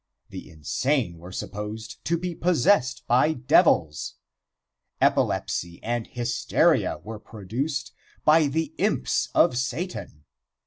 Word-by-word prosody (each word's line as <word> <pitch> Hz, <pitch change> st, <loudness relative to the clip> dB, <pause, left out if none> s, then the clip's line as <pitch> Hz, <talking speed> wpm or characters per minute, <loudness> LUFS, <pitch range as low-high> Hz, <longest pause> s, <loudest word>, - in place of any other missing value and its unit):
The -, -, -9 dB
insane 90 Hz, -, -1 dB
were 90 Hz, +2 st, -10 dB
supposed 105 Hz, +3 st, -6 dB
to 170 Hz, +2 st, +1 dB
be 180 Hz, +1 st, -4 dB
possessed 165 Hz, -8 st, +2 dB
by 130 Hz, +6 st, +3 dB
devils. 125 Hz, -, +2 dB, 0.8 s
Epilepsy 85 Hz, 0 st, 0 dB
and 120 Hz, 0 st, -2 dB
hysteria 120 Hz, 0 st, +1 dB
were 110 Hz, 0 st, -7 dB
produced 115 Hz, +8 st, -4 dB, 0.3 s
by 155 Hz, 0 st, +6 dB
the 160 Hz, +3 st, -2 dB
imps -, -, +1 dB
of -, -, +5 dB
Satan. 130 Hz, -, -4 dB
120 Hz, 105 wpm, -25 LUFS, 105-155 Hz, 0.8 s, by